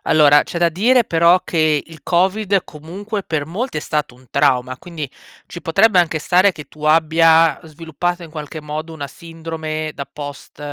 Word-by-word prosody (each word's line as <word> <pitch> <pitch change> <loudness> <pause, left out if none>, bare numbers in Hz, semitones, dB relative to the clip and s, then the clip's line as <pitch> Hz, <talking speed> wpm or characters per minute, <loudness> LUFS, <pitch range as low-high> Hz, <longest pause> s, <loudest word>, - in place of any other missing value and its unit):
Allora, 145 -1 +5
c'è 170 - -6
da 170 0 +3
dire 235 +9 +3
però 170 0 +4
che 155 -3 +1
il 160 -3 -14
Covid, 190 +2 +1
comunque, 195 +8 -7
per 155 -5 -3
molti 205 +7 -4
è - - -4
stato 150 -5 -3
un 130 +1 -21
trauma, 130 -3 +1
quindi 160 -4 -7 0.4
ci 175 - -9
potrebbe 195 +4 +3
anche 160 -2 -1
stare 185 +5 +3
che 150 - -10
tu 150 - -17
abbia 160 +1 +4
sviluppato 165 +3 -4
in 160 - -12
qualche 155 0 -7
modo 155 +2 -6
una 145 -3 -6
sindrome 160 0 -6
da 140 - -5
post, 145 -2 -9
160 Hz, 175 wpm, -19 LUFS, 150-175 Hz, 0.4 s, Allora